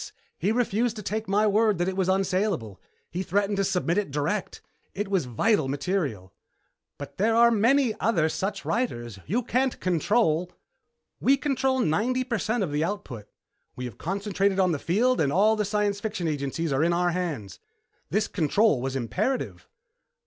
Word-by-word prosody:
He 195 Hz, +6 st, +1 dB
refused 235 Hz, 0 st, 0 dB
to 210 Hz, -, -7 dB
take 215 Hz, +3 st, -3 dB
my 205 Hz, +2 st, +2 dB
word 215 Hz, -1 st, +3 dB
that 175 Hz, +1 st, 0 dB
it 190 Hz, -, -2 dB
was 190 Hz, -1 st, 0 dB
unsalable. 190 Hz, -, 0 dB, 0.3 s
He 180 Hz, -, -3 dB
threatened 200 Hz, +2 st, 0 dB
to 195 Hz, -, +2 dB
submit 180 Hz, 0 st, +1 dB
it 205 Hz, -, -3 dB
direct. 150 Hz, +8 st, -2 dB, 0.4 s
It 205 Hz, 0 st, -3 dB
was 190 Hz, -7 st, +1 dB
vital 150 Hz, -, +1 dB
material." 140 Hz, -, -2 dB, 0.6 s
"But 145 Hz, -, -9 dB
there 225 Hz, +3 st, +3 dB
are 235 Hz, 0 st, +6 dB
many 235 Hz, +3 st, +3 dB
other 180 Hz, -8 st, +2 dB
such 195 Hz, +5 st, -3 dB
writers. 120 Hz, -, -2 dB
You 230 Hz, -, 0 dB
can't 255 Hz, +2 st, 0 dB
control 180 Hz, -1 st, +1 dB, 0.3 s
" -, -, -54 dB
"We 275 Hz, +1 st, +4 dB
control 265 Hz, -2 st, 0 dB
ninety 240 Hz, +8 st, +1 dB
percent 230 Hz, -2 st, -1 dB
of 165 Hz, -, -3 dB
the 150 Hz, +2 st, 0 dB
output. 155 Hz, -, -5 dB, 0.5 s
We 125 Hz, -, -5 dB
have 120 Hz, -5 st, -8 dB
concentrated 195 Hz, +1 st, 0 dB
on 185 Hz, -2 st, +3 dB
the 155 Hz, -, -1 dB
field 240 Hz, -, +2 dB
and 140 Hz, -3 st, +1 dB
all 205 Hz, +7 st, +4 dB
of 220 Hz, -, 0 dB
the 210 Hz, -, +1 dB
science 205 Hz, 0 st, 0 dB
fiction 200 Hz, -5 st, -3 dB
agencies 145 Hz, +1 st, -2 dB
are 135 Hz, +3 st, +2 dB
in 170 Hz, +1 st, +2 dB
our 175 Hz, 0 st, +1 dB
hands. 155 Hz, -, -4 dB, 0.5 s
This 210 Hz, +4 st, +1 dB
control 170 Hz, -, +2 dB
was 135 Hz, +1 st, -3 dB
imperative." 190 Hz, -, -2 dB
195 Hz, 175 wpm, -26 LUFS, 155-220 Hz, 0.6 s, are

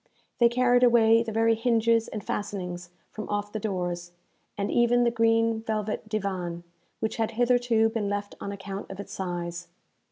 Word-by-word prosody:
They 235 Hz, -1 st, +6 dB
carried 245 Hz, 0 st, +3 dB
away 230 Hz, -2 st, +5 dB
the 230 Hz, -1 st, -3 dB
very 225 Hz, +1 st, +3 dB
hinges 230 Hz, 0 st, +2 dB
and 215 Hz, -2 st, -6 dB
fastenings 180 Hz, -4 st, -4 dB, 0.2 s
from 215 Hz, -, -7 dB
off 205 Hz, 0 st, -2 dB
the 215 Hz, -, -3 dB
doors, 175 Hz, -4 st, -3 dB, 0.4 s
and 200 Hz, 0 st, -1 dB
even 240 Hz, 0 st, +3 dB
the 235 Hz, -, +3 dB
green 225 Hz, -1 st, +2 dB
velvet 215 Hz, -1 st, -3 dB
divan, 185 Hz, -5 st, -3 dB, 0.4 s
which 220 Hz, -, -2 dB
had 225 Hz, 0 st, -1 dB
hitherto 245 Hz, -2 st, +3 dB
been 220 Hz, -3 st, -2 dB
left 205 Hz, 0 st, -3 dB
on 200 Hz, -, -4 dB
account 195 Hz, 0 st, -7 dB
of 195 Hz, -, -8 dB
its 200 Hz, -, -7 dB
size. 175 Hz, -1 st, -4 dB
220 Hz, 165 wpm, -27 LUFS, 195-230 Hz, 0.4 s, They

